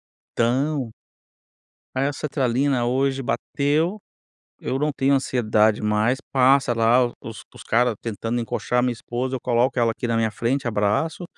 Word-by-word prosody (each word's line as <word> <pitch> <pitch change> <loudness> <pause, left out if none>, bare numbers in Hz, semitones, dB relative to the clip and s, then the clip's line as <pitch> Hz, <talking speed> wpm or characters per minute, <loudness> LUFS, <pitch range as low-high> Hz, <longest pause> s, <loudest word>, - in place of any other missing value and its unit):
Então 130 +1 -1 1.0
Aí 130 +1 +1
a - - -3
sertralina 135 -3 0
hoje 135 +2 0
bateu. 150 - -1 0.6
Eu 130 - -2
não 150 +1 0
tenho 135 0 +2
ansiedade 110 -5 +1
mais. 105 +4 +1
Passa 130 -1 +4
lá 120 +2 +3
o 120 - -7
os 110 -2 -9
os - - -12
cara 120 +1 +2
tentando 115 +1 -3
encoxar 125 +1 -2
a - - +3
minha 125 0 +1
esposa, 120 +3 -4
eu 130 - -3
coloco 125 +2 +1
ela 115 -1 +3
aqui 115 +2 -4
na 115 -1 0
minha 110 -1 +1
frente, 120 +5 -2
abraço, 110 - 0
125 Hz, 160 wpm, -23 LUFS, 115-135 Hz, 1.0 s, Passa